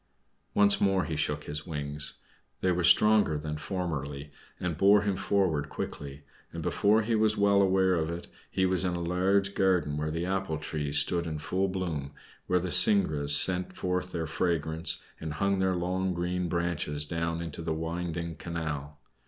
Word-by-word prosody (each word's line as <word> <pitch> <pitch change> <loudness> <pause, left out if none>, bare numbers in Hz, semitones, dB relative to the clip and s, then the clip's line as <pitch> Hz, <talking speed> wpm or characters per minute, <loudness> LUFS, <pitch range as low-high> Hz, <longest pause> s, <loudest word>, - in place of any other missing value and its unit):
Once 100 0 +4
more 95 -3 +2
he 80 - -3
shook 75 0 -1
his 75 +2 -5
wings. 75 -2 -3 0.5
They 95 - +2
were 90 0 0
stronger 105 -2 +5
than 75 0 -4
formerly 75 -5 -4 0.3
and 90 -3 -2
bore 100 +4 +5
him 100 -2 0
forward 85 -8 0
quickly, 70 0 -6 0.3
and - - -6
before 110 +2 +2
he 115 +2 -1
was 110 0 +2
well 100 0 +4
aware 95 -1 +3
of 80 -2 0
it 85 +1 -5 0.2
he 95 - +1
was 95 0 +1
in 90 -1 0
a - - -3
large 95 +3 +1
garden 90 -7 +1
where 75 +1 -2
the 80 +2 -2
apple 95 -4 -1
trees 75 -1 -2
stood 85 +1 +2
in 80 -1 -3
full 95 +5 -1
bloom, 85 -7 -4 0.3
where 90 - +2
the 90 0 -2
syringas 75 - +3
sent 90 +4 +3
forth 90 0 -2
their 80 -1 -3
fragrance 80 0 -1 0.2
and 80 -1 -5
hung 100 +6 0
their 95 -1 +1
long 90 +1 -1
green 90 0 -2
branches 80 -4 0
down 85 +2 -2
into 85 -1 -6
the 80 -1 -2
winding 85 +1 -4
canal. 75 -4 -5
85 Hz, 175 wpm, -29 LUFS, 75-95 Hz, 0.5 s, stronger